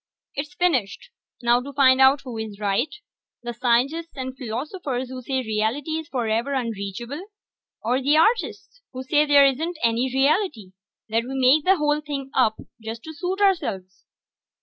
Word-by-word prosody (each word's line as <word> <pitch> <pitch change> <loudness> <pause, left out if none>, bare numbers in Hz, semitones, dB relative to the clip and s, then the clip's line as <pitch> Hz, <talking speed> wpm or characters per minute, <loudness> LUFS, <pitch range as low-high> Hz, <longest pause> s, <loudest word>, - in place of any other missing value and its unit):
"It's 295 +4 -5
finished. 270 - 0 0.3
Now 240 +1 +4
to 280 +2 -8
find 260 -1 +5
out 265 +1 +6
who 250 -3 -8
is 215 -2 -6
right, 210 +8 0 0.5
the 240 0 -4
scientists 255 +8 0
and 260 0 -5
philosophers 260 - -4
who 255 0 -7
say 260 +1 -2
reality 220 +7 -1
is 320 - -8
forever 240 0 -1
unreachable, 235 - -4 0.6
or 250 +4 +1
the 290 +3 +3
artists 470 +6 +1
who 255 0 -5
say 295 +3 +2
there 285 -1 +7
isn't 315 +6 0
any 235 +3 +1
reality 270 - +1 0.4
that 230 +2 0
we 265 +2 -5
make 265 +4 +4
the 380 +1 +5
whole 300 -1 +1
thing 280 -3 -5
up 220 -4 +3 0.3
to 230 +8 -7
suit 365 +6 -3
ourselves." 195 - 0
260 Hz, 155 wpm, -23 LUFS, 235-300 Hz, 0.6 s, there